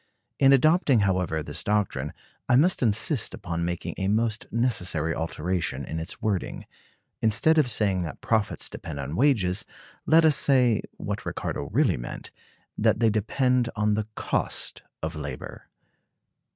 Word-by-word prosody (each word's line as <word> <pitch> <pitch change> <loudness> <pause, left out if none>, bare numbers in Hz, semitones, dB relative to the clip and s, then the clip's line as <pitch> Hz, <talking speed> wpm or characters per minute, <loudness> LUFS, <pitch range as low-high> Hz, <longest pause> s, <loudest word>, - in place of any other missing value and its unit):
In 135 -1 +6
adopting, 140 - +4
however, 90 -5 0
this - - -4
doctrine, 100 -9 0 0.4
I 125 - +5
must 170 +8 +3
insist 115 - +1
upon 85 -2 -4
making 85 0 -3
a 95 - 0
most 110 +1 0
necessary 90 -9 0
alteration 85 +2 -2
in 80 - -4
its 80 +3 -6
wording. 100 -4 -2 0.6
Instead 155 +9 +3
of 140 -5 +2
saying 100 -5 +1
that 80 -3 -5
profits 110 -3 0
depend 75 -3 -7
on 70 +3 -4
wages, 105 -8 +2 0.4
let 160 +1 +6
us 155 -2 +6
say 125 -6 +3 0.2
(what - - -4
Ricardo 70 - -4
really 115 - +2
meant) - - -7 0.4
that - - +2
they 115 -2 +4
depend 125 +3 +1
on 105 -1 +1
the 105 0 -1
cost - - -2 0.2
of 80 +1 -3
labor. 70 -4 -7
105 Hz, 145 wpm, -26 LUFS, 85-125 Hz, 0.6 s, In